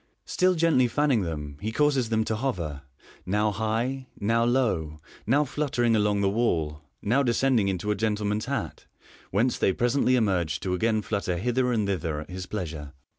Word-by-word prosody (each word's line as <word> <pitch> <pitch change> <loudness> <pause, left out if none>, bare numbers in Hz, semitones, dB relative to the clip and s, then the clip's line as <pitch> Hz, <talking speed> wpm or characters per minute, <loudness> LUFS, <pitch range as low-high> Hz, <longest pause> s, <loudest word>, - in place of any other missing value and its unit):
Still 185 0 +2
gently 160 -7 +3
fanni'ng 135 -2 +2
them, 75 -4 -5
he 110 +2 -2
causes 135 -2 +2
them 110 -1 +2
to 110 - -1
hover, 90 - -3 0.4
now 105 +3 +1
high, 115 +5 -2
now 115 +3 +2
low, 105 -12 0 0.3
low 145 +6 +3
fluttering 125 -5 0
along 105 -1 +2
the 100 - +2
wall, 80 -10 0 0.2
now 125 +7 +2
descending 120 -4 +2
into 95 +2 -1
a - - +1
gentleman's 105 0 -1
hat, - - -4 0.4
whence 115 +6 +1
they - - +3
presently 125 +4 +2
emerge 90 -9 +1
to 95 - -2
again 110 +3 +1
flutter 100 -5 -2
hither 125 +5 0
and 110 -4 +1
thither 85 -6 -2
at 75 - -10
his 95 +1 -6
pleasure. 80 -8 -5
110 Hz, 170 wpm, -26 LUFS, 90-125 Hz, 0.4 s, gently